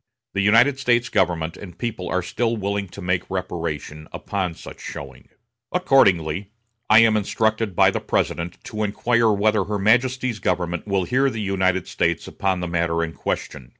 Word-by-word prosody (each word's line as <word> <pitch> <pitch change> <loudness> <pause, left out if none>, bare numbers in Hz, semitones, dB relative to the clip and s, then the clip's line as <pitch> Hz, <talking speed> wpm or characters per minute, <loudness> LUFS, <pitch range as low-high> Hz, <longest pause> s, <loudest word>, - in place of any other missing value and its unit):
The 100 - 0
United 115 +7 +4
States 120 -2 +2
government 85 -4 0
and 90 -4 -11
people 110 -7 -4
are 90 - 0
still 115 +5 -1
willing 100 -1 -2
to 95 +1 -10
make 90 0 -1
reparation 80 -4 -4
upon 95 -4 -3
such - - -11
showing. - - -9 0.4
"Accordingly, 100 - +3 0.4
I 110 +1 +8
am 115 -1 +4
instructed 110 -1 0
by - - +5
the - - -2
President 85 +1 -2
to 110 - -5
inquire 115 +2 +2
whether 105 -1 +2
her 105 +1 -2
Majesty's 125 +2 +2
government 90 0 -1
will 100 -2 +1
hear 130 +8 +2
the 115 - -5
United 95 -3 0
States 85 0 -1
upon 95 -2 -1
the 90 - -2
matter 85 -1 0
in 80 -1 -4
question. 65 -5 -4
100 Hz, 165 wpm, -22 LUFS, 90-110 Hz, 0.4 s, I